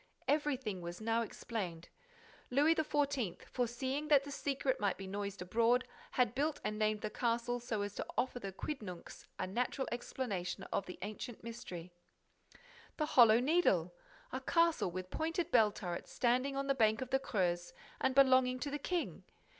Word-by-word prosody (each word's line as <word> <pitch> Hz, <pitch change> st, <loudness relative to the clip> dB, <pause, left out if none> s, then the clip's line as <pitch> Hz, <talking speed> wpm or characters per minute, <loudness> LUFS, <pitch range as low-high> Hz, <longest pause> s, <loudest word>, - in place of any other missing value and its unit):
Everything 265 Hz, -10 st, 0 dB
was 175 Hz, 0 st, -6 dB
now 225 Hz, +1 st, +1 dB
explained: 190 Hz, -7 st, -4 dB, 0.6 s
Louis 290 Hz, +5 st, +4 dB
XIV., 285 Hz, -, 0 dB
foreseeing 260 Hz, +4 st, -2 dB
that 290 Hz, -3 st, +6 dB
the 285 Hz, -, -7 dB
secret 275 Hz, -2 st, -1 dB
might 200 Hz, -3 st, +1 dB
be 195 Hz, -, -7 dB
noised 200 Hz, -1 st, -4 dB
abroad, 235 Hz, +6 st, +2 dB, 0.3 s
had 245 Hz, -3 st, +2 dB
built 290 Hz, +3 st, 0 dB
and 215 Hz, 0 st, -2 dB
named 215 Hz, 0 st, +1 dB
that 215 Hz, 0 st, -4 dB
castle 240 Hz, 0 st, 0 dB
so 225 Hz, -4 st, -2 dB
as 205 Hz, 0 st, -4 dB
to -, -, -4 dB
offer 250 Hz, -1 st, 0 dB
the 195 Hz, -4 st, -5 dB
quidnuncs 190 Hz, -, -6 dB
a -, -, -1 dB
natural 245 Hz, +7 st, -1 dB
explanation 235 Hz, -6 st, -3 dB
of 195 Hz, -, 0 dB
the 180 Hz, -, -7 dB
ancient 215 Hz, +3 st, -6 dB
mystery. 185 Hz, -7 st, -7 dB, 1.0 s
The 305 Hz, -, +1 dB
Hollow 235 Hz, -5 st, +7 dB
Needle! 245 Hz, -, +3 dB, 0.4 s
A 260 Hz, -, -2 dB
castle 335 Hz, -, +3 dB
with 185 Hz, +1 st, -6 dB
pointed 330 Hz, +2 st, -1 dB
bell 215 Hz, -1 st, +6 dB
turrets 175 Hz, -4 st, -5 dB
standing 255 Hz, +3 st, +1 dB
on 275 Hz, 0 st, -1 dB
the 275 Hz, -, +2 dB
bank 220 Hz, -3 st, +3 dB
of 255 Hz, -, -11 dB
the 265 Hz, -, +3 dB
Creuse 175 Hz, -8 st, -1 dB, 0.3 s
and 265 Hz, -1 st, +1 dB
belonging 260 Hz, -2 st, +5 dB
to 285 Hz, -, -2 dB
the 290 Hz, -, -2 dB
King. 350 Hz, +4 st, -2 dB
240 Hz, 165 wpm, -35 LUFS, 205-275 Hz, 1.0 s, Hollow